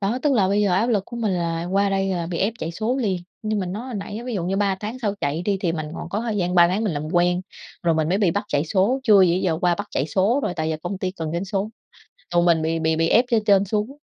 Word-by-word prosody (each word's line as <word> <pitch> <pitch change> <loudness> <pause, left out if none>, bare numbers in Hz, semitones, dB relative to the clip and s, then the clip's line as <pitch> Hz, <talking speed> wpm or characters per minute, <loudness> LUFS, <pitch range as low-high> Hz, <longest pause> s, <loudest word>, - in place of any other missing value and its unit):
Đó, 210 +5 0
tức 295 -2 +3
là 200 -6 +3
bây 200 +2 +2
giờ 195 -3 +2
áp 200 +6 +2
lực 210 -5 +1
của 235 - -9
mình 220 -4 0
là 170 -1 -1
qua 200 0 +3
đây 195 0 0
là 175 -3 -2
bị 170 -1 -4
ép 210 +3 +1
chạy 165 - -3
số 225 +8 -1
liền, 210 -8 0 0.3
như 215 -1 -1
mình 185 -3 -2
nói 225 +6 -5
hồi 250 - -6
nãy 205 +1 -5
á 240 - -8
ví 245 -2 -4
dụ 180 -4 -2
như 190 +2 -1
3 200 -1 +1
tháng 220 +4 -5
sau 210 -5 -1
chạy 145 +4 -1
đi 200 0 +1
thì 175 -4 0
mình 155 -2 -4
còn - - -6
có 200 +4 -2
thời 225 -2 -2
gian 180 -2 0
3 175 -1 +6
tháng 205 +5 -1
mình 195 - 0
làm 150 +1 -4
quen, 175 0 +2 0.4
rồi 170 -1 +2
mình 155 0 0
mới 190 - +1
bị 200 -5 +3
bắt 205 +4 -2
chạy 145 0 0
số, 200 - +1
chưa 210 -6 +6
gì 175 -2 +4
ý 185 - 0
giờ 165 -4 0
qua 175 -1 +3
bắt 205 +3 -5
chạy 135 - -1
số 195 - +2
rồi 180 - -2
tại 160 -1 -2
giờ 155 - -1
công 185 +2 -4
ty 185 -1 -2
cần 160 -4 -5
doanh 170 +3 -2
số, 195 +1 -2 0.7
còn 175 0 +4
mình 165 -2 +3
bị 165 +1 0
bị 160 0 +1
bị 165 +1 +2
ép 240 - +5
trên 220 -3 +2
trên 200 -2 +4
xuống. 215 +7 -2
190 Hz, 320 wpm, -23 LUFS, 170-210 Hz, 0.7 s, 3